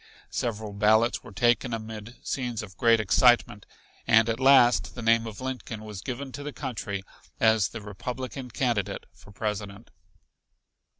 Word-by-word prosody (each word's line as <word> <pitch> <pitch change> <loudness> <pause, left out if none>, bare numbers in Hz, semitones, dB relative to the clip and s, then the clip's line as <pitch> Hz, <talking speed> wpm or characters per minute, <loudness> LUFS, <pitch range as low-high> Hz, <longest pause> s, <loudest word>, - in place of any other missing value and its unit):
Several 110 -3 -3
ballots 110 +3 +3
were 125 - -12
taken 120 +3 +2
amid 110 +1 -8
scenes 120 -4 -3
of 95 -3 -11
great 115 +1 +4
excitement, 110 +2 +3 0.4
and 110 +1 +5
at 115 +1 -1
last 125 - +5
the 125 - -6
name 115 0 +3
of 110 -2 -8
Lincoln 125 -4 -5
was 105 -3 -8
given 130 +4 -5
to 145 - -7
the 145 +1 -5
country 100 -7 -5 0.4
as 110 -3 +4
the 115 +2 -8
Republican 125 +5 -6
candidate 110 -5 -1
for 100 - -17
President. 105 0 -5
115 Hz, 145 wpm, -27 LUFS, 105-125 Hz, 0.4 s, and